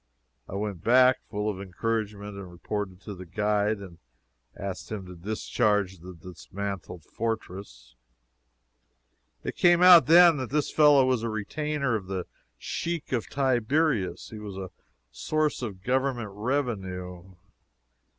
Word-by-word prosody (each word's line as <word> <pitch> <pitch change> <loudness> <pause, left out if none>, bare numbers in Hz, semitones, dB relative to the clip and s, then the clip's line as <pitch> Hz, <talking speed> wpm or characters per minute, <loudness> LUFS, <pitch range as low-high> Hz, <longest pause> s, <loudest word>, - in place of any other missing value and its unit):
I - - -6
went 100 -4 -4
back, 130 +2 +5
full 105 0 -3
of 100 -3 -3
encouragement, 105 +1 -3
and 100 -2 -8
reported 95 +1 -5
to 105 - -7
the 90 -1 -10
guide, 105 +3 0
and 95 -4 -11 0.6
asked 100 +1 -6
him 105 -3 -5
to 90 - -10
discharge 105 0 -1
this 90 +2 -10
dismantled 90 0 -7
fortress. 95 - -5 1.5
It - - -4
came 175 0 +4
out, 180 -2 +9
then. 165 -4 +7
This 150 +4 -1
fellow 145 -3 +6
was 130 -3 +1
a 115 - -2
retainer 140 +5 -2
of 100 -4 -4
the 95 -2 -3 0.3
Sheik 170 - -4
of 120 -4 -1
Tiberias. 130 - 0
He 110 - -8
was 100 -2 -8
a 95 -2 -6 0.4
source 155 -2 -1
of 100 -6 -6
Government 125 -3 -1
revenue. 95 -7 -3
105 Hz, 130 wpm, -27 LUFS, 95-130 Hz, 1.5 s, out